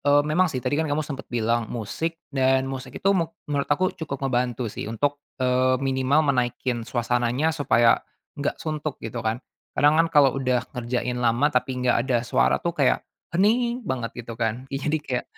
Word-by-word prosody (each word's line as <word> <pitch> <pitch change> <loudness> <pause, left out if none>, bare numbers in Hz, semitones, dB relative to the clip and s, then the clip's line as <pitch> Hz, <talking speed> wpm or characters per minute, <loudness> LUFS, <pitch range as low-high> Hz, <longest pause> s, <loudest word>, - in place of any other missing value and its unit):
e 145 0 +4
memang 170 +4 +2
sih 130 -5 -4
tadi 125 - 0
kan 160 - -1
kamu 150 +1 0
sempet 140 -2 -7
bilang 115 -1 0
musik 140 +9 -3 0.2
dan 130 0 +3
musik 130 -1 -6
itu 195 - +2
me 170 -4 +1 0.2
menurut 145 -1 -2
aku 185 +6 +2
cukup 140 -4 -5
ngebantu 125 -3 -1
sih - - -5
untuk, 145 +6 -1 0.2
eee, 130 0 +2
minimal 135 +3 +2
menaikkan 125 -1 -1
suasananya 120 +5 0
supaya 120 -6 +3 0.4
enggak 145 - -1
suntuk, 155 -2 -4
gitu 115 +1 -4
kan. 110 0 0 0.4
Kadang 150 +2 +5
kan 165 - +4
kalau 145 -5 +5
udah 125 -2 +1
ngerjain 125 0 -2
lama 125 +5 +2
tapi 125 0 0
enggak 125 0 +1
ada 120 -2 +1
suara - - +2
tuh 170 - -2
kayakm - - +2 0.3
hening 235 +5 +2
banget 120 - -3
gitu 115 - -7
kan, 115 +2 -1
ih 135 - -2
jadi 150 +2 0
kayak, 135 -5 -3
130 Hz, 185 wpm, -24 LUFS, 120-150 Hz, 0.4 s, Kadang